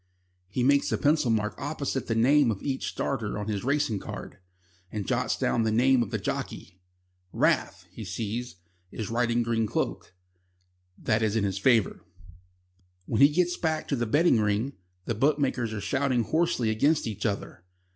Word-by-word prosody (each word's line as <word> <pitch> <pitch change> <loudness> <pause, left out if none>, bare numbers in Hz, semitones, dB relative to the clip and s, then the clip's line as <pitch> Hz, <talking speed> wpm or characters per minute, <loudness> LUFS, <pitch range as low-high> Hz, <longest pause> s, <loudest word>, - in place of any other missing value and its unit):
He 125 +5 -1
makes 140 +2 +3
a - - +1
pencil 150 -3 +2
mark 105 -1 0
opposite 140 -2 -3
the 115 - 0
name 135 +3 +4
of 105 -4 -3
each 135 -2 -2
starter 115 -7 -3
on 105 0 -4
his 105 -2 -2
racing 140 -6 0
card, - - -8 0.5
and 105 -2 -4
jots - - 0
down 120 - +1
the 110 - +1
name 125 +3 +4
of 115 - -2
the - - -2
jockey. 90 - -5 0.5
Raff, - - +1
he - - -8
sees, 115 +2 -4 0.3
is 110 +2 -6
riding 120 0 +1
Green 115 -1 0
Cloak. 95 - -3 0.8
That 110 0 0
is 110 -1 +1
in 110 -3 +1
its 95 -1 -2
favour. 115 0 +2 1.0
When 110 - 0
he 140 - +8
gets 175 +3 +1
back 160 -2 -1
to 140 - +1
the 120 -2 -1
betting 150 0 +4
ring, 105 +6 0 0.3
the - - -1
bookmakers 130 -2 +1
are 105 -1 -4
shouting 125 +5 0
hoarsely 140 -5 +1
against 145 +8 +2
each 105 -3 -5
other. 100 -4 -5
120 Hz, 170 wpm, -27 LUFS, 110-140 Hz, 1.0 s, he